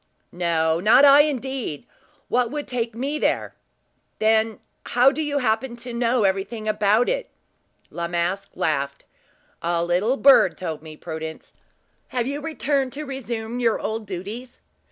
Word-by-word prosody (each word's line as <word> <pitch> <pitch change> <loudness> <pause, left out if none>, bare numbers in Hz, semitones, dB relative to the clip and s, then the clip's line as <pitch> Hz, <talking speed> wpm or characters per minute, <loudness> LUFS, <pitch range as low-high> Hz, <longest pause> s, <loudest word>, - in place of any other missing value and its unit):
"No. 165 -2 +1
Not 230 +9 +6
I, 280 0 +8
indeed! 265 - -3 0.4
What 245 -1 +1
would 295 +2 -5
take 235 -2 -3
me 280 +5 -2
there?" - - 0 0.6
"Then 220 0 +2 0.2
how 250 +3 +4
do 315 - -3
you 295 -2 -1
happen 235 -1 0
to 240 +1 -7
know 235 0 +1
everything 200 +3 -1
about 215 +2 +3
it?" - - -1 0.6
La 170 0 -3
Masque 175 +3 -2
laughed. 140 -2 -2 0.6
"A 170 0 0
little 190 +10 +1
bird 270 -10 +6
told 160 -4 -5
me, 155 -1 -11
Prudence! 160 -1 -7 0.5
Have 245 -2 -2
you 285 +3 -3
returned 285 -4 -1
to 300 +2 -5
resume 240 -4 -5
your 230 -3 +2
old 220 -1 -4
duties?" 205 +7 -7
225 Hz, 145 wpm, -23 LUFS, 180-265 Hz, 0.6 s, I